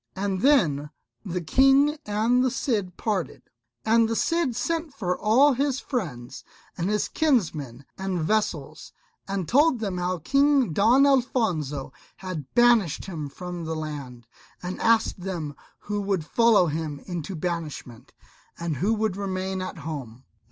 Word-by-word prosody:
And 195 Hz, -1 st, -2 dB
then 160 Hz, -, +3 dB, 0.3 s
the 180 Hz, -3 st, -3 dB
King 270 Hz, -, +4 dB
and 225 Hz, +5 st, +2 dB
the 260 Hz, -, +2 dB
Cid 210 Hz, -8 st, -2 dB
parted. 200 Hz, -7 st, -2 dB, 0.4 s
And 225 Hz, 0 st, +4 dB
the 230 Hz, -, -1 dB
Cid 330 Hz, -3 st, 0 dB
sent 325 Hz, +3 st, -2 dB
for 180 Hz, -4 st, -1 dB
all 260 Hz, +9 st, +4 dB
his 270 Hz, +1 st, 0 dB
friends 140 Hz, -, -5 dB, 0.3 s
and 175 Hz, +2 st, -2 dB
his 210 Hz, 0 st, 0 dB
kinsmen 155 Hz, -, 0 dB
and 190 Hz, -2 st, -2 dB
vassals, 155 Hz, -5 st, -2 dB, 0.3 s
and 195 Hz, -3 st, -3 dB
told 285 Hz, 0 st, +4 dB
them 195 Hz, -5 st, -3 dB
how 180 Hz, +1 st, -1 dB
King 275 Hz, -, +2 dB
Don 240 Hz, -, +5 dB
Alfonso 185 Hz, -, 0 dB, 0.2 s
had 170 Hz, -7 st, -6 dB
banished 240 Hz, -, +4 dB
him 155 Hz, -6 st, -5 dB
from 175 Hz, +3 st, -7 dB
the 160 Hz, 0 st, -3 dB
land, 140 Hz, -6 st, -6 dB, 0.4 s
and 180 Hz, +1 st, -5 dB
asked 225 Hz, -3 st, +2 dB
of -, -, -10 dB
them 160 Hz, -6 st, -4 dB, 0.3 s
who 205 Hz, 0 st, -3 dB
would 195 Hz, -5 st, -1 dB
follow 225 Hz, +2 st, +4 dB
him 155 Hz, -2 st, -3 dB
into 175 Hz, 0 st, -5 dB
banishment, 155 Hz, -8 st, -5 dB, 0.5 s
and 170 Hz, -4 st, -3 dB
who 205 Hz, -, +1 dB
would 215 Hz, -3 st, -1 dB
remain 190 Hz, -1 st, -3 dB
at 185 Hz, 0 st, -5 dB
home. 140 Hz, -6 st, -7 dB
190 Hz, 145 wpm, -25 LUFS, 160-235 Hz, 0.5 s, Don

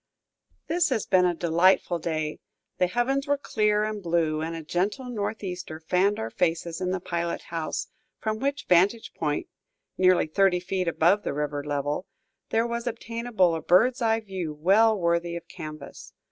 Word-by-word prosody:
This 340 Hz, 0 st, +1 dB
has 240 Hz, -6 st, 0 dB
been 185 Hz, -2 st, +4 dB
a 175 Hz, -, 0 dB
delightful 170 Hz, +1 st, +3 dB
day; 155 Hz, -2 st, -3 dB, 0.4 s
the 180 Hz, -, +4 dB
heavens 265 Hz, +8 st, 0 dB
were 285 Hz, 0 st, +2 dB
clear 210 Hz, -6 st, +1 dB
and 215 Hz, -1 st, -3 dB
blue, 165 Hz, -3 st, 0 dB
and 165 Hz, +1 st, -3 dB
a 165 Hz, -, -6 dB
gentle 190 Hz, -, -1 dB
northeaster 195 Hz, -7 st, -4 dB
fanned 185 Hz, +5 st, +1 dB
our 110 Hz, +1 st, -4 dB
faces 170 Hz, +2 st, -1 dB
in 180 Hz, -, 0 dB
the 185 Hz, 0 st, -1 dB
pilot 170 Hz, -1 st, -3 dB
house, 165 Hz, -2 st, -2 dB, 0.3 s
from 215 Hz, 0 st, -2 dB
which 280 Hz, +2 st, -2 dB
vantage 195 Hz, +6 st, +3 dB
point, 150 Hz, -2 st, -2 dB, 0.5 s
nearly 185 Hz, -1 st, +5 dB
thirty 180 Hz, +3 st, +2 dB
feet 185 Hz, 0 st, -2 dB
above 170 Hz, +5 st, +3 dB
the -, -, -3 dB
river 145 Hz, -1 st, -2 dB
level, 145 Hz, +4 st, -2 dB, 0.4 s
there 225 Hz, +1 st, +2 dB
was 235 Hz, 0 st, -3 dB
obtainable 230 Hz, -5 st, 0 dB
a 165 Hz, -, -2 dB
bird's 245 Hz, +9 st, +3 dB
eye 225 Hz, -1 st, +2 dB
view 185 Hz, -7 st, -5 dB
well 205 Hz, +8 st, +4 dB
worthy 170 Hz, 0 st, 0 dB
of 170 Hz, -, -7 dB
canvas. 155 Hz, -2 st, -9 dB
180 Hz, 165 wpm, -26 LUFS, 165-215 Hz, 0.5 s, nearly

